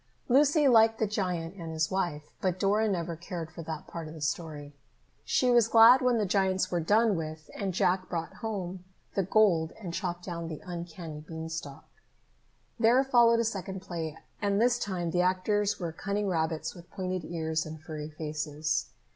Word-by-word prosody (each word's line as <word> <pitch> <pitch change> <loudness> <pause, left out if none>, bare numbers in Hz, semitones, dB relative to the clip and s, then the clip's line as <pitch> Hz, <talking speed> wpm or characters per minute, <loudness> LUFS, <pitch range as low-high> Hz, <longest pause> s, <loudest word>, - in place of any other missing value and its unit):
Lucy 290 +3 +4
liked 225 -2 +6
the 220 - +1
giant 180 -5 -2
and 165 -3 -6
his 160 -1 -1
wife, 170 -6 -2
but 185 -1 0
Dora 210 +3 +2
never 170 -3 -2
cared 170 -1 -6
for 170 - -8
that 160 -1 -6
part 165 -2 -7
of 155 - -9
the 155 - -10
story. 145 -1 -3 0.5
She 255 -2 +2
was 240 -2 +5
glad 230 +3 +8
when 250 -2 +3
the 215 - +1
giants 190 -1 +1
were 175 - +1
done 210 +5 +3
with 155 -1 -6
and 195 -2 -2
Jack 185 +1 +1
brought 165 -2 -4
home 190 -5 -4 0.3
the 195 - +1
gold 180 -4 +3
and 180 -6 -6
chopped 175 -2 -3
down 170 -2 -4
the 155 -2 -6
uncanny 170 -3 -7
beanstalk. 160 -2 -7 0.9
There 240 +4 +5
followed 235 -3 +5
a - - +1
second 195 -4 -3
play, 165 -4 -5 0.2
and 200 0 +1
this 245 +1 +3
time 180 -6 -2
the 180 - +2
actors 195 +3 +1
were 170 -3 -3
cunning 200 +5 -2
rabbits 160 -2 -1
with 175 -1 -14
pointed 185 -2 -3
ears 160 -2 -2
and 155 0 -8
furry 155 -1 -7
faces. 155 0 -2
180 Hz, 180 wpm, -29 LUFS, 160-205 Hz, 0.9 s, glad